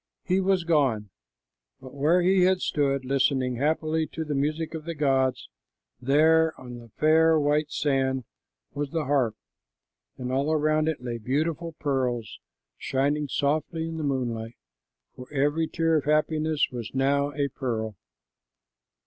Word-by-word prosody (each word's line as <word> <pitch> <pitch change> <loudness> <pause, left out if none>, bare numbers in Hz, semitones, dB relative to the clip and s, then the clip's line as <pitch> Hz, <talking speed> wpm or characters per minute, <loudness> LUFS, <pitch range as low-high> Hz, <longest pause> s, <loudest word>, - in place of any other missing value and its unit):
He 185 0 +1
was 190 -2 +2
gone, 135 - +1 0.7
but 130 -1 -12
where 155 +6 +2
he 185 +1 +4
had 185 +1 +4
stood 140 -2 0
listening 130 -2 +1
happily 155 +3 0
to 160 - -5
the 150 - -3
music 155 +4 -1
of 160 -1 -6
the 170 -1 -4
gods, 135 -3 +1 0.5
there 160 +5 +3
on 125 -2 -9
the 115 -1 -14
fair 160 +1 +4
white 150 +1 +1
sand 135 -3 0 0.5
was 145 -1 -3
the 160 0 -2
harp, 130 -6 +1 0.8
and 125 0 -4
all 140 +4 0
around 155 0 +2
it 160 -6 -2
lay 120 -1 -4
beautiful 155 +7 -2
pearls, 130 -7 -2 0.4
shining 145 +2 0
softly 155 +4 -1
in 165 0 -5
the 155 - -3
moonlight, 120 -5 -2 0.6
for 125 +2 -11
every 145 +3 +1
tear 165 0 +1
of 145 - -2
happiness 155 0 +1
was 120 0 -7
now 140 +2 +1
a 140 -1 -1
pearl. 110 -5 -3
145 Hz, 145 wpm, -26 LUFS, 130-160 Hz, 0.8 s, he